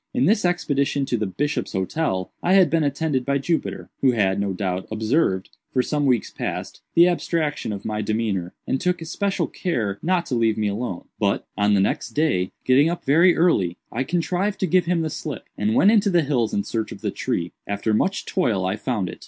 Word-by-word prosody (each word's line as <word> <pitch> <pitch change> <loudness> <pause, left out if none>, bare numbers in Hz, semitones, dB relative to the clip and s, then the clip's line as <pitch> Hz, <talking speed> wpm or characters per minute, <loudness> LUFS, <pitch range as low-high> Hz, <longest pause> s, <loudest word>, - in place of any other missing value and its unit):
"In 255 - +3
this 210 -1 +3
expedition 145 -5 0
to 125 - -1
the 110 -3 -1
'Bishop's 145 +10 -2
Hotel' 95 - -1
I 180 - +2
had 185 -6 +5
been 165 -1 +2
attended 145 -1 0
by 140 +2 +1
Jupiter, 160 +4 -2
who 130 -2 +4
had, 100 -3 +1
no 100 -1 0
doubt, 95 -1 -3
observed, 110 - 0 0.2
for 130 - +2
some 145 0 0
weeks 125 -3 +1
past, - - -5
the 170 +1 +7
abstraction 165 -7 -1
of 100 -2 -6
my 105 0 -2
demeanor, 105 -4 -2
and 135 - -1
took 180 -1 +1
especial 195 +4 -1
care 110 - -2
not 175 0 +1
to - - -5
leave 115 -2 +2
me 105 -1 0
alone. 100 -3 -4
But, - - 0
on 105 0 +3
the - - +3
next 100 - -1
day, 145 - +1
getting 135 +5 +5
up 175 - -4
very 165 +6 +5
early, 100 - +2
I 125 - -1
contrived 180 +6 -1
to - - +3
give 180 0 +3
him 170 -1 +1
the 155 - -2
slip, 145 -5 -5
and 105 +1 0
went 200 - +6
into 210 -2 +4
the 175 -3 +3
hills 125 -6 0
in 100 - 0
search 110 +1 -3
of - - -9
the - - -1
tree. 85 0 -2 0.2
After 100 +2 -1
much 190 - 0
toil 110 - 0
I 95 +3 -1
found 110 -5 -2
it. - - -8
135 Hz, 210 wpm, -23 LUFS, 105-170 Hz, 0.2 s, the